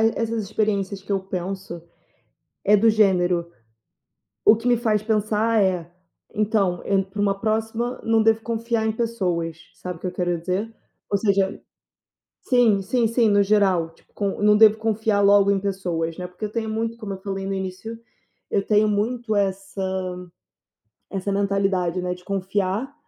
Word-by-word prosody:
essas 230 -1 -1
experiências 200 -1 -1
que 200 - -7
eu 195 - +1
penso, 190 -2 -5 0.8
eh, 210 +1 +5
do 225 +3 +3
gênero, 180 -5 +2 1.0
o - - +8
que 235 +2 -3
me 240 - +4
faz 220 -3 0
pensar, 215 +1 +1
eh, 180 -3 0 0.4
então 205 -4 +1
eu 195 - +2
entro 190 0 -2
para 205 +1 -5
uma 200 -1 +2
próxima, 225 +3 -1
não 225 0 +3
devo 225 0 +3
confiar 230 -1 -1
em 220 - +1
pessoas. 180 -8 -2 0.2
Sabe 180 -2 -7
o - - -25
que 185 - -4
eu 180 - -3
quero 175 -1 -1
dizer? 190 +6 -2 0.4
Ou 200 - +2
seja, 195 -2 +1 0.8
sim, 235 -6 +3
sim, 235 +4 +1
sim, 230 -1 +2
no 205 0 +4
geral, 195 -5 +2
tipo, - - -29
com 200 0 -3
não 210 0 +5
devo 220 -1 +7
confiar 220 -1 0
logo 200 0 +5
em 200 - +2
pessoas, 180 -4 -3
né, 180 - -4
porque 180 +4 -8
eu 210 - -4
tenho 225 -1 -2
muito 225 +1 -3
como 210 -4 -5
eu 190 - -8
falei 195 -1 -4
no 195 - -2
início, 190 +4 -5 0.5
eu 195 - 0
tenho 215 0 +3
muito 220 +2 -1
essa 190 -1 -2 1.0
essa 195 0 -3
mentalidade, 195 -3 0
né, 180 0 -2
de 180 0 -13
confiar, 200 +6 -2
200 Hz, 170 wpm, -23 LUFS, 190-220 Hz, 1.0 s, o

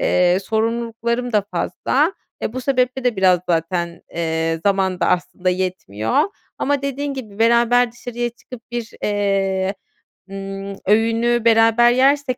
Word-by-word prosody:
eee, 180 0 +3
sorumluluklarım 235 +2 -1
da 210 -2 +3
fazla. 300 +10 0 0.3
E, - - -2
bu 255 - -4
sebeple 255 -1 0
de 245 -3 +1
biraz 185 -2 +4
zaten, 170 +1 -1
eee, 165 -1 -1
zaman 190 -2 +1
da - - +2
aslında 180 0 0
yetmiyor. 180 - -1 0.4
Ama 285 0 0
dediğin 280 +1 -3
gibi, 215 -6 -8
beraber 235 +1 +4
dışarıya 240 0 -4
çıkıp 240 0 -12
bir, 240 -1 -4
eee, 195 -1 0 0.6
ımm, 195 0 -6
öğünü 230 +2 +2
beraber 225 +1 +5
yersek 265 +1 +2
225 Hz, 130 wpm, -20 LUFS, 190-245 Hz, 0.6 s, beraber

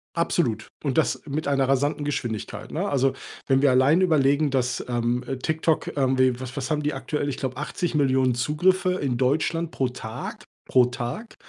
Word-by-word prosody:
Absolut. 170 -8 0 0.2
und 135 -1 -1
das 160 - +1
mit 150 +1 -3
einer 135 -1 +1
rasanten 145 +2 +1
Geschwindigkeit, 120 -7 -4
ne? 185 +6 -2
Also, 135 -1 +2 0.3
wenn 135 0 +3
wir 140 -2 +5
allein 135 +8 +4
überlegen, 150 -3 +3
dass, 125 -2 0
ähm, 120 +1 0
äh, 135 +1 -3
TikTok, 160 +3 -1
ähm, 130 -2 +1
wie 130 -2 +3
was 130 +1 -7
was 135 - -3
haben 150 -1 0
die 150 - 0
aktuell? 145 +2 -2
Ich 135 - -4
glaube, 130 -2 -3
80.000.000 135 -4 +1
Zugriffe 180 +8 +2
in 135 -8 -1
Deutschland 160 +5 0
pro 130 - 0
Tag 110 -3 -7 0.3
pro 125 -2 +5
Tag. 125 - -5
135 Hz, 180 wpm, -25 LUFS, 125-150 Hz, 0.3 s, wir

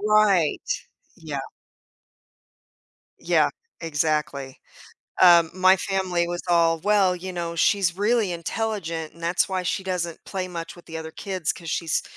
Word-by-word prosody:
Right, 210 -6 +3 0.5
yeah. - - -5 1.8
Yeah, - - +3 0.3
exactly. 150 -4 -1 0.6
Um, 170 -2 +7
my 185 +1 +5
family 185 -3 -1
was 175 0 -3
all, 165 -1 +3
"Well, 200 -1 +3
you 185 +1 -6
know, 170 -1 -4
she's 180 0 +2
really 210 -1 +1
intelligent 170 -3 -3
and 170 - -16
that's 170 +4 +1
why 190 -1 -1
she 190 +2 -2
doesn't 175 -3 -3
play 185 -2 -4
much 170 -2 -6
with 175 - -16
the 165 - -7
other 160 0 -6
kids 185 -4 -3
'cause 165 -3 -8
she's 165 -1 0
175 Hz, 140 wpm, -24 LUFS, 165-190 Hz, 1.8 s, Um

